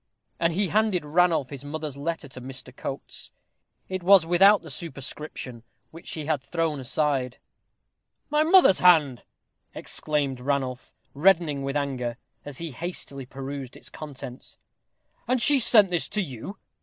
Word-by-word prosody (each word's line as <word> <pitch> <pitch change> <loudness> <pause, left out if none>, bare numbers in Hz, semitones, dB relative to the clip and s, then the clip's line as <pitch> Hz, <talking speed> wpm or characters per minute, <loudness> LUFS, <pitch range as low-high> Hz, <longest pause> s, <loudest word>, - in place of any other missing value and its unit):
And 165 0 +1
he 195 +1 0
handed 210 -6 +1
Ranulph 160 -3 +2
his 140 -1 -7
mother's 150 -1 -5
letter 150 +1 -4
to 130 - -10
Mr. 130 0 -8
Coates. 135 0 -6 0.6
It 185 -1 -4
was 185 -1 +6
without 195 +4 +5
the 160 - -8
superscription, 135 -4 -5 0.3
which 165 +2 -11
he 155 -2 -5
had 150 -3 0
thrown 160 0 -2
aside. 130 -1 0 0.9
"My 300 0 +3
mother's 335 - +6
hand!" 155 -9 +4 0.5
exclaimed 145 -4 -1
Ranulph, 130 -1 -3 0.2
reddening 160 -2 +3
with 135 +1 -2
anger, 125 -5 -3 0.3
as 145 -2 -8
he 165 -2 -5
hastily 140 -2 -6
perused 135 0 -7
its - - -13
contents. 135 -4 -9 0.7
"And 255 +1 +2
she 280 +4 +5
sent 210 -5 +6
this 175 -2 0
to 210 - -1
you? 135 - -8
150 Hz, 145 wpm, -25 LUFS, 135-175 Hz, 0.9 s, was